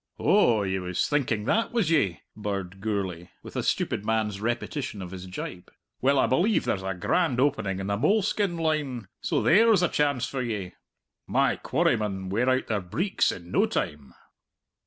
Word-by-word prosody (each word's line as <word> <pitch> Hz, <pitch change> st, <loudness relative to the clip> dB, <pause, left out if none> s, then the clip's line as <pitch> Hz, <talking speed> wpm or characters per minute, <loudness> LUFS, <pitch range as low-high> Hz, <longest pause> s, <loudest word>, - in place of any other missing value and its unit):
"Oh, 120 Hz, -, +4 dB
ye 95 Hz, -1 st, -1 dB
was 90 Hz, -1 st, -1 dB
thinking 120 Hz, -8 st, 0 dB
that, 225 Hz, -, +1 dB
was 220 Hz, -9 st, +1 dB
ye?" 95 Hz, -, +2 dB
birred 100 Hz, -3 st, -4 dB
Gourlay, 95 Hz, -5 st, -3 dB
with -, -, -11 dB
a -, -, 0 dB
stupid 100 Hz, -, -1 dB
man's 105 Hz, -2 st, -1 dB
repetition 120 Hz, +1 st, -3 dB
of 90 Hz, -2 st, -7 dB
his 95 Hz, -1 st, -8 dB
jibe. 90 Hz, -1 st, -7 dB, 0.3 s
"Well, 140 Hz, +2 st, +3 dB
I -, -, +4 dB
believe 185 Hz, -, +2 dB
there's 95 Hz, -, 0 dB
a 95 Hz, 0 st, -3 dB
grand 130 Hz, -, +1 dB
opening 130 Hz, -9 st, +1 dB
in 95 Hz, -, -4 dB
the 100 Hz, +1 st, -1 dB
moleskin 200 Hz, -, +1 dB
line, 150 Hz, -, -1 dB
so -, -, 0 dB
there's 210 Hz, +1 st, +5 dB
a -, -, +4 dB
chance 140 Hz, -4 st, +1 dB
for 135 Hz, -, -3 dB
ye. 105 Hz, -7 st, -4 dB, 0.5 s
My -, -, +2 dB
quarrymen 95 Hz, -3 st, 0 dB
wear 115 Hz, +7 st, +1 dB
out 130 Hz, 0 st, +2 dB
their 105 Hz, -3 st, -1 dB
breeks 165 Hz, -, 0 dB
in 85 Hz, 0 st, -9 dB
no -, -, +3 dB
time." 75 Hz, -3 st, -4 dB
110 Hz, 175 wpm, -26 LUFS, 95-145 Hz, 0.5 s, there's